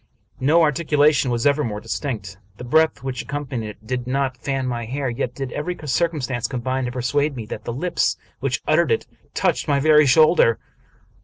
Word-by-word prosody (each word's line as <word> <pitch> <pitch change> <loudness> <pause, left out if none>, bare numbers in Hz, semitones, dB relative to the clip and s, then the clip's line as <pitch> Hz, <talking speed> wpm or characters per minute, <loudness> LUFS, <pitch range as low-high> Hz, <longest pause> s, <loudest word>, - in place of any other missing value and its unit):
No 155 +6 +4
articulation 150 -3 +3
was 120 -1 -1
ever 145 +1 +3
more 105 -5 -3
distinct. 105 -7 -5 0.2
The - - -8
breath 155 +1 +2
which 130 -2 -3
accompanied 135 -6 -4
it 105 +1 -13
did 125 +1 -3
not 135 0 0
fan 135 +1 -3
my 120 -2 -3
hair, 135 +2 -2
yet 120 0 -3
did 135 -2 -5
every 175 +4 -3
circumstance 130 -5 -1
combine 130 +1 -2
to 125 - -3
persuade 140 +4 0
me 115 -3 -6
that 105 0 -7
the - - -3
lips 175 +9 0 0.2
which - - -2
uttered - - +3
it 455 - +1 0.3
touched - - 0
my 140 -2 +2
very 150 0 +5
shoulder. 155 -4 +5
130 Hz, 180 wpm, -22 LUFS, 120-150 Hz, 0.3 s, very